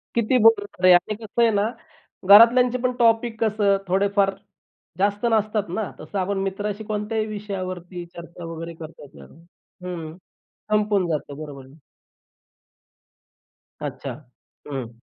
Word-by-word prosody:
किती 235 +2 +2
बोलणार 205 -4 +3
आहे 185 - +9
आणि 180 +4 +2
कसं 220 +2 -3
आहे 230 -1 +5
ना, 205 +1 +1 0.6
घरातल्यांचे 235 +4 +7
पण 255 - +2
टॉपिक 230 -1 +2
कसं 205 -2 +2
थोडेफार 195 +1 +2 0.7
जास्त 205 +3 +1
नसतात 215 -3 0
ना, 200 +4 -3
तसं 200 - -5
आपण 195 +2 -1
मित्राशी 205 +2 -3
कोणत्याही 215 +1 -2
विषयावरती 185 -4 -6
चर्चा 170 0 -10
वगैरे 165 +1 -7
करता 160 -1 -10
येते 135 - -15 0.7
हं. 165 -2 -6 0.5
संपून 210 -3 +2
जातं, 145 -3 -3
बरोबर 140 -3 -10
आहे. 135 +2 -17 2.1
अच्छा! 135 - -5 0.5
हं. 120 -5 -6
200 Hz, 125 wpm, -23 LUFS, 175-215 Hz, 2.1 s, आहे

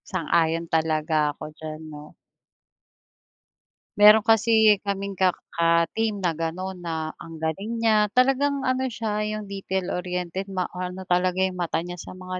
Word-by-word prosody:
Sang-ayon 165 -3 +1
talaga 155 -1 +1
ako 150 +1 -9
diyan, 155 0 -8
'no. 150 0 -11 1.8
Meron 210 +1 +8
kasi 220 -1 +4
kaming 200 -1 -3
ka 185 -1 +3 0.2
ka-team 170 +5 +1
na 175 - +2
gano'n 175 +4 -4
na, 160 -2 -4
ang 165 0 -10
galing 195 +9 -2
niya, 215 -2 +4
talagang 270 +2 +2
ano 260 0 0
siya, 220 -3 -3
'yong 215 -1 -5
detail-oriented, 180 -1 -3
ma-ano 185 -1 -4
talaga 180 +1 +1
yung 185 -1 -2
mata 170 -1 -1
niya 175 0 -7
sa 185 - -9
mga 185 0 -6
185 Hz, 135 wpm, -24 LUFS, 165-210 Hz, 1.8 s, Meron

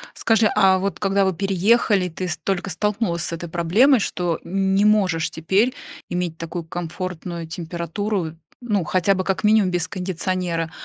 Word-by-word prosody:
Скажи, 225 -1 +3
а 190 -3 +5
вот 195 +1 -3
когда 195 0 +2
вы 190 -1 +1
переехали, 195 +1 +2
ты 180 +2 -5
ст 165 -1 -3
только 195 -1 -1
столкнулась 195 -1 -1
с - - -4
этой 170 +1 -5
проблемой, 185 - +4
что 175 -4 -1
не 195 +2 +1
можешь 185 -6 +2
теперь 195 +10 +1 0.4
иметь 175 -2 -2
такую 165 +1 -5
комфортную 175 0 -5
температуру, 170 +2 -3 0.3
ну, 210 -7 -1
хотя 185 +4 +2
бы 185 0 -2
как 195 0 -1
минимум 210 -3 +4
без 175 -2 -1
кондиционера. 180 -2 -2
185 Hz, 155 wpm, -22 LUFS, 170-200 Hz, 0.4 s, а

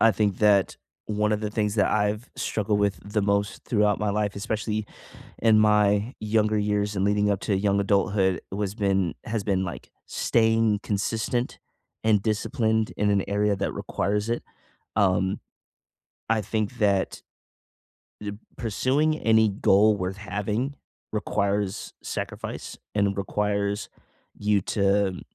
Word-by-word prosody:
I 115 - +6
think 100 -2 0
that 100 -3 +3 0.3
one 105 0 0
of 105 - 0
the 105 - -2
things 105 -1 0
that 105 - +2
I've 105 +3 0
struggled 105 -1 0
with 100 -1 +1
the 105 +1 -1
most 100 +1 0
throughout 105 -2 +2
my 105 -1 0
life, 105 0 -1
especially 110 0 -2 0.5
in 110 -1 +5
my 105 +2 +3
younger 110 0 +1
years 105 0 0
and 95 - +1
leading 105 0 +2
up 100 - 0
to 100 - 0
young 100 0 +2
adulthood, 100 -1 +2
was 100 +1 -3
been 95 -6 +1
has 110 -3 -2
been, 95 -2 +1
like, 85 - -7 0.2
staying 115 -2 +2
consistent 110 +4 -1 0.5
and 105 -3 +3
disciplined 110 0 0
in 105 0 +2
an 100 -1 +2
area 100 0 +1
that - - -2
requires 105 +4 -2
it. 120 - -1 0.5
Um, 95 -1 +2 0.9
I 110 -1 +2
think 110 +3 -2
that 100 -2 +1 1.0
th 105 -1 -4 0.2
pursuing 135 +8 +1
any 110 -1 +4
goal 105 +1 +4
worth 95 +1 -3
having 105 +7 -2 0.4
requires 100 -1 -1
sacrifice, - - -5 0.2
and 100 -1 +1
requires 100 +1 -1 0.5
you 105 -1 +2
to 100 -2 +1
105 Hz, 135 wpm, -25 LUFS, 100-110 Hz, 1.0 s, I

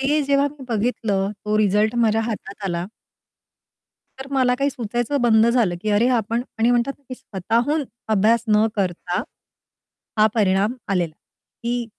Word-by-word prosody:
ते 290 +3 +2
जेव्हा 280 0 +2
मी 280 -2 -12
बघितलं, 210 -3 0
तो 210 0 0
रिझल्ट 210 +2 +2
माझ्या 225 -2 +3
हातात 210 -3 -6
आला. 175 -2 -2 1.3
तर 265 - -7
मला 255 -2 +2
काही 280 +2 +1
सुचायचं 240 +2 -2
बंद 225 -2 +5
झालं, 235 -7 +2
की 215 - -2
अरे 210 +4 +3
आपण 230 +2 -1 0.2
आणि 230 +2 +3
म्हणतात 245 +3 +1
ना - - -33
की - - -4
स्वतःहून 235 - -1 0.2
अभ्यास 220 +2 +3
न 215 0 +4
करता, 180 -1 -1 1.0
हा 215 0 +6
परिणाम 205 0 +2 0.2
आलेला, 175 -4 0 0.5
की 240 0 -1
225 Hz, 150 wpm, -22 LUFS, 205-245 Hz, 1.3 s, हा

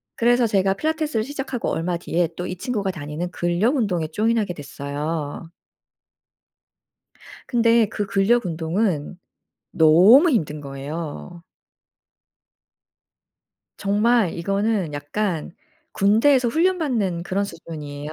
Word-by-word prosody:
그래서 240 +1 +3
제가 195 -2 +2
필라테스를 310 -3 -1
시작하고 270 -2 -4
얼마 175 +1 -1
뒤에 170 0 -1
또 180 +1 -4
이 185 - -4
친구가 200 0 -2
다니는 155 +1 -5
근력 175 - 0
운동에 185 - 0
join하게 215 0 0
됐어요. 145 +1 -5 2.0
근데 230 -2 +3
그 210 0 -3
근력 200 +4 +2
운동은 170 0 -2 0.5
너무 190 - +6
힘든 155 - -1
거예요. 150 +4 -7 2.3
정말 210 0 +2
이거는 195 -1 -1
약간 160 +4 -3 0.4
군대에서 235 +6 +3
훈련받는 260 - 0
그런 195 +3 -1
수준이에요. 150 -4 -8
190 Hz, 255 characters per minute, -22 LUFS, 165-230 Hz, 2.3 s, 너무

